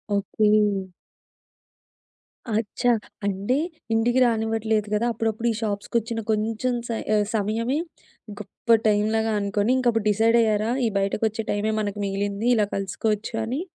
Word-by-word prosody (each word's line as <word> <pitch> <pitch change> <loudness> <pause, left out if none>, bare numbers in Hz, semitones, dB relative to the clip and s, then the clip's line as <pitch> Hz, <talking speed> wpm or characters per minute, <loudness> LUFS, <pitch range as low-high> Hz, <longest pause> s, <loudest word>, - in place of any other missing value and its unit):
Okay. 210 +1 +1 2.1
అచ్చా! 245 +3 0 0.3
అంటే 200 +6 0 0.4
ఇంటికి 240 +3 +2
రానివ్వట్లేదు 220 -2 0
కదా! 220 +3 +1
అప్పుడప్పుడు 225 +1 -1
ఈ - - -1
షాప్సుకొచ్చిన 225 +2 -2
కొంచెం 225 +4 0
స - - -17 0.3
ఆ - - +4 0.2
సమయమే, 225 +6 0 0.6
గొప్ప 230 +2 +1
టైంలాగా 220 +1 +2
అనుకొని 205 +3 0
ఇంకప్పుడు 235 -4 +1
డిసైడ్ 225 +3 +3
అయ్యారా? 215 0 +1 0.2
ఈ - - +1
బయటకొచ్చే 215 +3 -1
టైమే 205 +1 0
మనకు 205 0 -3
మిగిలింది. 200 +3 -2
ఇలా 210 - +3
కలుసుకోవచ్చు 205 +3 -2
అని. 255 +8 -2
220 Hz, 120 wpm, -24 LUFS, 205-230 Hz, 2.1 s, ఆ